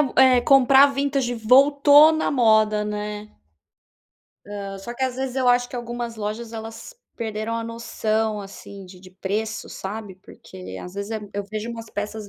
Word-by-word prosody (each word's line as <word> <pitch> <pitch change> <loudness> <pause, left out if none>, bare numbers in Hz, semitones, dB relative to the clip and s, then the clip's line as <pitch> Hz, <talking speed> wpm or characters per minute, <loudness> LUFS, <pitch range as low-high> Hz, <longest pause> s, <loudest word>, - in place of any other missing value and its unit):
o 280 -4 0 0.3
comprar 270 0 +6
vintage 275 -3 -1
voltou 285 +6 +6
na 315 - -1
moda, 220 -4 +3
né. 210 0 -5 1.2
Hã, 200 -1 -7
só 235 +5 -8
que 265 - -5
às 255 -1 -3
vezes 265 -1 -4
eu 255 -2 +2
acho 245 0 +3
que 250 - -7
algumas 240 -1 -5
lojas 220 +2 -5
elas 225 - -9 0.2
perderam 220 0 -4
a 230 - -4
noção, 220 -2 -2
assim, 195 0 -11
de 180 0 -14
de 185 0 -15
preço 210 +4 -4
sabe 205 0 -7
porque 185 -1 -11
às 180 - -10
vezes 200 +1 -5
é 225 - -2
e 210 -1 -11
eu 205 0 -3
vejo 215 +1 -5
umas 225 -1 -9
peças 210 0 -5
220 Hz, 170 wpm, -22 LUFS, 210-245 Hz, 1.2 s, comprar